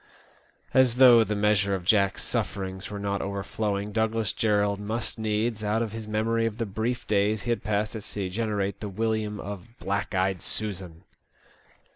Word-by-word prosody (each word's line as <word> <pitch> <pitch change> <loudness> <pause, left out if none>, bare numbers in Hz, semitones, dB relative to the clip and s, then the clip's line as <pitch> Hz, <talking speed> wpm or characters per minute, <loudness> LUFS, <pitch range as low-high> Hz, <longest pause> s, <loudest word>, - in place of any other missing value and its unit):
As 130 -3 +5
though 125 -3 +8
the 105 -1 -2
measure 100 -1 +2
of 90 -2 -6
Jack's 100 -1 +3
sufferings 95 -1 -3
were 105 - -5
not 100 0 -2
overflowing, 100 +1 -2
Douglas 110 -2 0
Jerrold 105 -3 +1
must 110 +2 -3
needs, 110 +1 -1
out 110 +2 +1
of 110 - -4
his 110 0 -6
memory 115 +2 +1
of 110 -1 -5
the 115 - -1
brief 110 +4 -2
days 105 0 +1
he 120 - -1
had 120 - -1
passed 105 +1 -1
at 110 - -4
sea, 100 -1 -4
generate 100 -1 -2
the 105 - -5
William 110 0 -1
of 105 +4 -8
" - - -36
Black 100 +1 -2
eyed 95 -1 +1
Susan 95 -6 -3
105 Hz, 175 wpm, -27 LUFS, 100-110 Hz, -, though